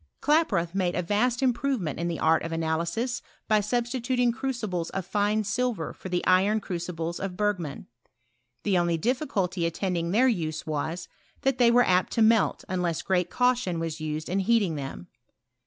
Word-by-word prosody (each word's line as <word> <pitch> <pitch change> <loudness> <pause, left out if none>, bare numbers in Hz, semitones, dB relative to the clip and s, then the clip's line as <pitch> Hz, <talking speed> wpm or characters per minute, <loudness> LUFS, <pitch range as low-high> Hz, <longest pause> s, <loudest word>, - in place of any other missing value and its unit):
Klaproth 220 - +2
made 185 -2 0
a 180 - 0
vast 235 +7 +1
improvement 245 - 0
in 170 - -1
the 170 -2 -2
art 160 0 +3
of 165 - -5
analysis, 170 +10 -1 0.3
by 215 -1 +4
substituting 245 +2 0
crucibles 220 -8 -3
of 190 -2 -4
tine 210 +1 +1
silver 215 -4 -1
for 190 - -9
the 180 0 -1
iron 195 +4 +4
crucibles 170 -3 -4
of 190 -2 -4
Bergman. 185 -8 -2 0.8
The 195 -4 +2
only 170 -1 +1
difficulty 195 - -1
attend 180 +2 -2
ing 170 0 -1
their 235 +8 +4
use 160 -9 -1
was, 160 +3 -3 0.4
that 270 -2 +1
they 240 -1 +6
were 245 +1 +5
apt 185 0 +2
to 230 - +3
melt 225 0 +3
unless 180 -3 -1
great 180 -2 +1
caution 250 -8 +1
was 165 -1 -4
used 155 0 -3
in 190 +2 0
heating 200 -3 +2
them. 140 +3 -6
190 Hz, 170 wpm, -27 LUFS, 170-235 Hz, 0.8 s, they